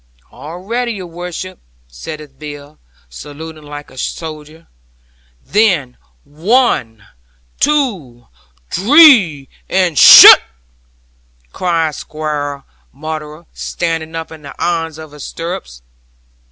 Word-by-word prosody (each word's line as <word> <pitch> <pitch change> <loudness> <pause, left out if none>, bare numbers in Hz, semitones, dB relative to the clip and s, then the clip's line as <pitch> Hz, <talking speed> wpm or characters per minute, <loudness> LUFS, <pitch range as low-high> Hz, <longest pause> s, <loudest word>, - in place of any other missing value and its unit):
'"All 160 +4 -10
ready, 235 +6 -3
your 190 -3 -8
worship," 175 +2 -8 0.3
saith 140 - -10
Bill, 145 -1 -11 0.3
saluting 155 - -11
like 145 -1 -11
a 130 - -12
soldier. 155 +1 -7 0.8
'"Then, 180 - +1 0.3
one, 155 - -1 0.5
two, 195 - -1 0.5
dree, 205 - +5 0.2
and 180 -5 +1
shutt!" - - +10 1.1
cries 165 -4 -1
Squire 145 -2 -5 0.3
Maunder, 155 +2 -8
standing 165 -1 -4
up 165 0 -6
in 160 -1 -12
the 140 -1 -11
irons 165 -2 -2
of 155 -2 -11
his 150 -1 -11
stirrups. 165 - -7
160 Hz, 100 wpm, -15 LUFS, 145-180 Hz, 1.1 s, shutt